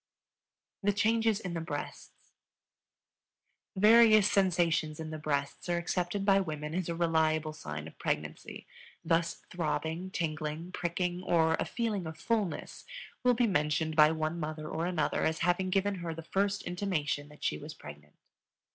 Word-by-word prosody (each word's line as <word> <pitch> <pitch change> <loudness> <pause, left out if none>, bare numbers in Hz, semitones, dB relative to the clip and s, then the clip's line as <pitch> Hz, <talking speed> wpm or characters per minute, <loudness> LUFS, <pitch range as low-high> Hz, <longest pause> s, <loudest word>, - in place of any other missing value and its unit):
The 205 0 +2
Changes 225 +1 +2
in 180 -5 -5
the 165 - -2
Breasts. 150 -3 -7 1.4
Various 215 0 +6
sensations 170 -5 +2
in 160 -1 -5
the 155 - -5
breasts 145 +2 -2
are 175 - +2
accepted 180 +3 -1
by 195 -1 +5
women 150 -4 -4
as 180 -1 -2
a 170 - -1
reliable 160 -2 +1
sign 75 - -6
of 80 - -14
pregnancy; 75 0 -4 0.4
thus 165 +1 0
throbbing, 165 +1 -2
tingling, 155 -1 -3
pricking, 180 +1 -2
or 165 -3 +3
a - - 0
feeling 215 -7 -2
of 160 - -7
fullness 215 -7 -2 0.4
will 250 -1 +4
be 240 +1 +3
mentioned 155 -4 +1
by 150 -1 +7
one 160 +1 -2
mother 155 -1 -4
or 165 +2 -2
another 160 -5 0
as 160 0 +1
having 180 +1 +1
given 195 +2 +1
her 170 -3 -5
the 165 - -7
first 200 +3 0
intimation 170 -6 -2
that 150 - -15
she 75 - 0
was - - -8
pregnant. 75 0 -12
170 Hz, 155 wpm, -31 LUFS, 155-190 Hz, 1.4 s, by